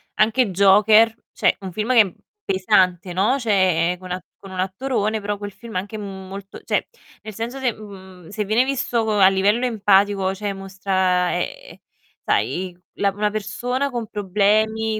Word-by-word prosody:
anche 220 0 +2
Joker, 210 +4 +5 0.2
cioè - - +2
un 190 -1 -6
film 215 +6 -2
che 235 - +6
è - - +6
m 185 - -8 0.3
pesante, 185 -2 +1
no, 215 +9 +2
cioè 185 -6 +2
è 180 - -10
con 185 0 -10
a 180 0 -3 0.2
con 195 - -11
un 185 - -6
attorone 215 +2 -1
però 205 0 -3
quel 205 0 -7
film 230 -3 -11
anche, 205 +4 -4
mhmm, 195 -2 -8
molto 195 +1 -9
cioè, - - 0 0.4
nel 215 0 -9
senso 235 +6 -5
se 255 -3 +1
mhmm, 190 -5 -13
se 210 +1 -3
viene 220 +5 +2
visto 245 -4 -1
co 215 -1 0
a 190 - +8
livello 200 +5 +2
empatico, 200 -3 +2
cioè, 205 0 -3
mostra 190 -2 0
ehm, - - -6 0.5
sai 180 -1 -1 0.2
la 200 - 0
una 210 +2 -1
persona 245 +6 -2
con 240 -4 -4
problemi, 215 +2 +1
205 Hz, 175 wpm, -21 LUFS, 190-220 Hz, 0.5 s, a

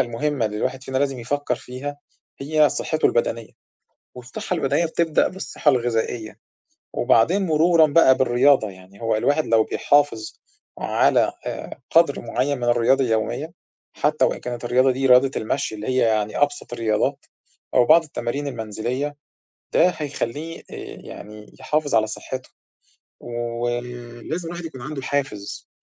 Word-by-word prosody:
المهمة 130 +1 0
اللي 105 0 -4
الواحد 130 +4 -2
فينا 130 0 -2
لازم 135 -2 0
يفكّر 135 +2 -1
فيها 130 +4 -7 0.4
هي 150 +2 +3
صحّته 155 +2 0
البدنية، 115 -1 -1 0.6
والصحّة 125 0 -5
البدنية 155 +5 +1
بتبدأ 160 -1 +1
بالصحّة 185 -4 -3
الغذائية، 115 -4 -1 0.6
وبعدين 165 - +3
مرورًا 160 0 +5
بقى 145 -3 +5
بالرياضة، 130 -2 +3
يعني 95 +1 -16
هو 115 -1 +1
الواحد 145 +7 +1
لو 115 -1 +4
بيحافظ 145 -7 +1 0.4
على - - +2
آآ - - -6
قَدْر 165 -4 +4
معيّن 125 +4 -1
من 120 - -3
الرياضة 120 +3 +3
اليومية، 125 +7 -1 0.4
حتّى 155 +1 +1
وإن - - 0
كانت 120 -1 -5
الرياضة 130 +2 +3
دي 135 +1 -1
رياضة 130 +1 +6
المشي 110 0 -2
اللي 105 0 -6
هي 130 0 +1
يعني 110 -3 +1
أبسط 145 -3 0
الرياضات 110 -3 -1 0.5
أو 125 - +6
بعض 165 +5 +7
التمارين 145 -1 -4
المنزلية، 120 +4 -3 0.6
ده 180 - +5
هيخلّيه 150 +2 -4
آآ - - -16 0.4
يعني 105 0 -11
يحافظ 150 -1 -1
على 110 -1 +4
صحّته، 130 +4 -6 0.7
وم 120 0 -4 0.6
لازم 170 +1 -3
الواحد 175 0 -6
يكون 135 -6 -8
عنده 140 +2 -5
حافز 130 -7 -3
130 Hz, 140 wpm, -22 LUFS, 115-145 Hz, 0.7 s, بعض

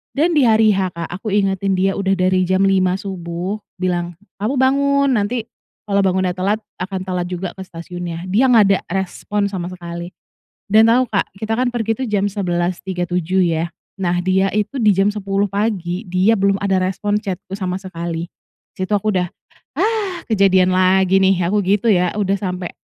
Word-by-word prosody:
Dan 315 +5 +2
di 295 - +4
hari 220 -1 +5
H, 190 -1 0
Kak, 170 -1 -4
aku 190 +5 -7
ingetin 195 -1 +1
dia 190 +1 +2
udah 195 -1 0
dari 185 0 +2
jam 185 +1 +2
5 185 -1 +2
subuh 185 0 -4 0.2
bilang, 175 -1 -1 0.3
"kamu 225 +7 0
bangun, 280 +1 +3
nanti 220 +3 -1 0.4
kalau 200 -1 +2
bangunnya 185 0 +1
telat 195 +4 0 0.2
akan 190 0 -3
telat 180 -1 -2
juga 180 +1 -3
ke 190 - -7
stasiunnya." 175 0 -7
Dia 225 +8 +3
gak 225 -3 +7
ada 195 -1 +3
respon 195 +2 -2
sama 185 -3 -5
sekali 170 -1 -7 0.6
dan 220 +2 +6
tau, 240 +3 +5
Kak, 200 -3 -1
kita 220 +2 -2
kan 255 0 +2
pergi 225 -2 -1
tuh 260 - -2
jam 205 -3 0
11.37 180 -1 -1
ya, 165 -1 0 0.3
nah 175 -2 0
dia 190 +1 +2
itu 215 +6 -1
di 215 -4 +4
jam 195 +2 +3
10 200 -1 -1
pagi, 200 -2 -2
dia 185 +5 +2
belum 195 0 +2
ada 195 -2 +2
respon 205 +3 0
chat-ku 195 -2 -6
sama 185 -2 -2
sekali. 170 -3 -5 0.5
Disitu 185 +2 -1
aku 205 +1 +1
udah, 180 -1 +1 0.5
"ah 415 -5 -1
kejadian 190 -4 +3
lagi 190 +1 +3
nih," 190 -1 +4
aku 205 +3 +1
gitu 200 +4 +1
ya, 180 -3 +3
udah 195 -1 +1
sampe 180 -2 -4
190 Hz, 175 wpm, -19 LUFS, 180-210 Hz, 0.6 s, gak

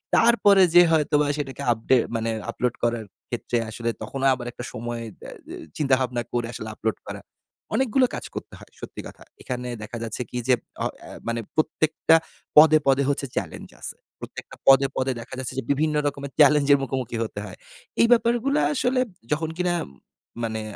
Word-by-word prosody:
তারপরে 210 -4 +5
যেয়ে 175 -1 +7
হয়তোবা 150 -1 +3
সেটাকে 140 -1 -5
আপডে 115 +3 +2 0.2
মানে 115 0 -1 0.2
আপলোড 125 0 -1
করার 115 -2 0 0.2
ক্ষেত্রে 120 - -2
আসলে 115 +1 -3
তখনও 135 0 -1
আবার 125 -1 -8
একটা 120 - -8
সময় 120 +1 -4 0.2
দে - - -9 0.2
দে - - -7 0.2
চিন্তাভাবনা 130 -4 +1
করে 120 -1 0
আসলে 110 - -6
আপলোড 110 0 -2
করা। - - -6 0.5
অনেকগুলো 260 0 +3
কাজ - - -6
করতে - - -7
হয়, - - -16
সত্যি - - -8
কথা। - - -14 0.2
এখানে 125 -1 -4 0.2
দেখা 115 +3 -6
যাচ্ছে 115 +2 -4
কি? 125 - -5
যে 130 - +5 0.3
অ - - 0 0.2
এ - - -11 0.2
মানে 115 0 -1 0.2
প্রত্যেকটা 155 +1 +2 0.4
পদে, 155 0 +9
পদে 135 +1 +4
হচ্ছে 140 0 0
চ্যালেঞ্জ - - -4
আছে। - - -5 0.2
প্রত্যেকটা - - -9
পদে, 135 0 +7
পদে 130 0 +1
দেখা 115 - -12
যাচ্ছে 130 - -4
যে - - -4
বিভিন্ন 150 +2 +1
রকমের 140 -1 -4
চ্যালেঞ্জের 145 -1 +6
মুখোমুখি 130 -3 -3
হতে 110 -2 -6
হয়। 95 - -10 0.4
এই 235 - +6
ব্যাপারগুলো 240 +4 +3 0.2
আসলে 255 -2 +1 0.3
যখন 160 +1 0
কিনা 180 -1 +1 0.7
মানে 110 -1 -2
135 Hz, 170 wpm, -24 LUFS, 120-155 Hz, 0.7 s, পদে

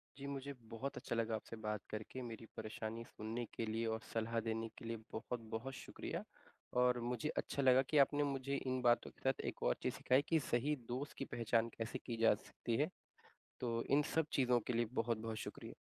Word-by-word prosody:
जी 140 +1 -6
मुझे 140 0 -3 0.2
बहुत 125 +5 -3
अच्छा - - -2
लगा 115 -1 +1
आपसे 110 +1 -6
बात 105 -1 -1
करके। 110 +4 -4
मेरी 115 -2 -6
परेशानी 110 +1 -4
सुनने 115 +3 -4
के 115 - -1
लिए 115 +1 0
और 110 - -4
सलाह 115 0 +1
देने 115 0 0
के - - -9
लिए 115 0 -2
बहुत-बहुत 115 +2 -3
शुक्रिया। - - -4 0.6
और 125 -1 +5
मुझे 125 +5 -1
अच्छा 140 - 0
लगा 130 0 +7
कि 155 - +3
आपने 145 +1 +6
मुझे 140 -1 0
इन 130 -2 0
बातों 120 -1 +4
के - - -26
साथ 135 - 0
एक - - -7
और 60 - +4
चीज़ - - +1
सिखाई 130 +2 +4
कि 165 - +5
सही 140 +5 +3
दोस्त 130 +4 -3
की 135 - -2
पहचान 115 0 +3
कैसे 115 +3 -2
की 120 -2 -2
जा 115 - +8
सकती 115 +2 -3
है। 150 +4 +3 0.7
तो 115 -1 0
इन 140 +2 +6
सब 160 -1 +4
चीज़ों 125 -3 +4
के - - +1
लिए 120 0 +2
बहुत-बहुत 115 -1 -1
शुक्रिया। - - -7
120 Hz, 200 wpm, -39 LUFS, 115-135 Hz, 0.7 s, जा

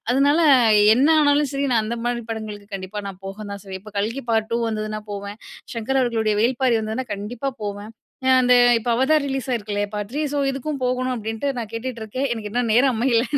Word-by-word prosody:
அதனால, 280 +4 +3 0.6
என்ன 265 +6 +3
ஆனாலும் 290 -1 +3
சரி 275 0 -1
நான் 225 -2 +3
அந்த 230 +2 -3
மாரி 240 0 -1
படங்களுக்கு 215 -2 -6
கண்டிப்பா 190 +2 -6
நான் 190 -1 -8
போக 195 0 -6
தான் 200 0 -6
செய்வேன். 190 -1 -7
இப்போ 215 - -11
கல்கி 230 +7 -2
பார்ட் 220 -1 +1
2 235 - +2
வந்ததுன்னா 215 -1 -3
போவேன். 200 +1 -6 0.4
சங்கர் 265 +4 0
அவர்களுடைய 225 -3 +1
வேள்பாரி 245 0 +2
வந்ததுன்னா 220 +4 -3
கண்டிப்பா 225 +6 -4
போவேன். 205 +1 -5 0.4
அ - - +3
அந்த, 250 0 +4 0.2
இப்போ 230 +2 -3
அவதார் 285 +4 +3
ரிலீஸ் 270 -2 -3
ஆயிருக்குல்லையா 205 -3 -2
பார்ட் 205 -1 -3
3 300 - -1
,ஸோ 290 - 0
இதுக்கும் 275 +1 -4
போகணும் 255 0 0
அப்டீன்ட்டு 225 +5 -3
நான் 225 -3 -5
கேட்டுட்ருக்கேன். 235 +2 -4
எனக்கு 215 -3 -5
இன்னும் 235 0 0
நேரம் 255 +1 +4
அமையல. 235 0 +2
230 Hz, 195 wpm, -22 LUFS, 215-260 Hz, 0.6 s, அந்த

